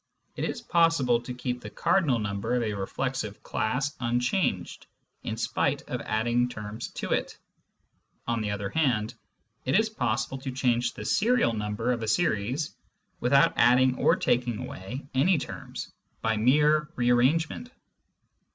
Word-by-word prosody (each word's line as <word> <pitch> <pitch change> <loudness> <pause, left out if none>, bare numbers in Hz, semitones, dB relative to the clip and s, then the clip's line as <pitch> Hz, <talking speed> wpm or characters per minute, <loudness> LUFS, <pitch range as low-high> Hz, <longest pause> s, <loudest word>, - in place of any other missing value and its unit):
It - - -2
is - - -4
possible 165 -8 +3
to 120 - -7
keep 125 0 -3
the 105 - -7
cardinal 140 - +2
number 105 +2 -2
of 125 - +1
a 110 -2 -1
reflexive 110 +2 -3
class 125 +7 -1
unchanged 125 - -1 0.3
in - - -4
spite - - 0
of - - -4
adding 120 +3 +1
terms 105 0 -6
to - - -5
it; - - -1 0.9
on 115 -1 0
the 105 - -2
other 100 -1 -3
hand, 120 -8 +1 0.5
it 130 +10 +3
is 220 0 +1
possible 125 - -1
to 130 0 -5
change 125 -2 0
the - - -7
serial 225 - +2
number 105 +2 -1
of 120 -2 -1
a 110 - -3
series 130 +1 0 0.5
without 140 +3 +4
adding 125 +2 +5
or - - +4
taking 120 -2 0
away 125 +1 -7
any 165 +7 +3
terms, - - -7 0.3
by 110 0 +2
mere 150 +6 +3
re 120 0 +2
arrangement. 155 - +2
125 Hz, 150 wpm, -27 LUFS, 110-135 Hz, 0.9 s, adding